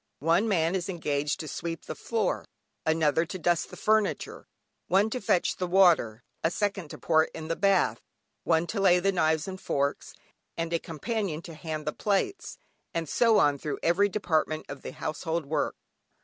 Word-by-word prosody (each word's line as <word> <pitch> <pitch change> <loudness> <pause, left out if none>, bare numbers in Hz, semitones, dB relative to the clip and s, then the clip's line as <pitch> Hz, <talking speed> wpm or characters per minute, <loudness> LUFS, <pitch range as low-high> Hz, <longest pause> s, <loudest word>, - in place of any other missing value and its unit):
One 170 - +2
man 170 -4 +2
is 190 0 -2
engaged 150 -5 -1
to 155 - -7
sweep 165 +3 -5
the - - -4
floor, 225 -4 -1 0.4
another 160 0 +3
to 185 - -5
dust 175 -1 +1
the - - -10
furniture, 215 -2 0 0.4
one 200 +4 +3
to 255 - -3
fetch 185 -3 +1
the 180 - -2
water, 170 - +4 0.2
a 160 - +3
second 195 -3 -2
to - - -8
pour 160 -1 +3
it - - -14
into 160 0 -7
the 165 - 0
bath, 195 +1 +2 0.4
one 165 0 +2
to 200 +4 -3
lay 180 -2 +6
the 195 +2 +2
knives 160 -3 +1
and 190 -1 -6
forks, 140 0 -2 0.4
and 165 0 -2
a 170 - +2
companion 170 0 -3
to 170 - -9
hand 155 -1 -5
the 150 - -1
plates, 205 - -1 0.4
and 165 -1 -1
so 225 - +4
on 145 -1 +3
through 150 - -3
every 190 +5 +3
department 160 -6 0
of 140 - -7
the - - -7
household 160 +1 -3
work. 150 +1 -1
170 Hz, 185 wpm, -28 LUFS, 155-195 Hz, 0.4 s, lay